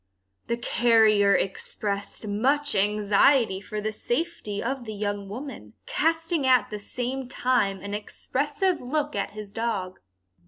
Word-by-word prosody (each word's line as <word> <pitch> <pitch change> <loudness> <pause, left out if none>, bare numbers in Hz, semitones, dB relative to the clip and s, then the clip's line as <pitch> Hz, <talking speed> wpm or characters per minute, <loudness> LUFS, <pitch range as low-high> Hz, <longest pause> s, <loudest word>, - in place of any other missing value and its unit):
The 235 - 0
carrier 220 -4 +4
expressed 200 +2 -3
much 270 +8 +1
anxiety 210 +2 +3
for 210 +1 -5
the 215 +1 -2
safety 240 -3 -3
of 260 0 -3
the 215 -1 -6
young 205 -1 -3
woman, 265 +7 -8
casting 325 - +1
at 250 -5 +4
the 210 - -4
same 250 +5 -4
time 240 -7 +1
an 200 +1 -6
expressive 290 - -1
look 295 +2 -1
at 200 - -1
his 210 -2 -7
dog. 205 -6 -2
225 Hz, 130 wpm, -26 LUFS, 205-270 Hz, -, carrier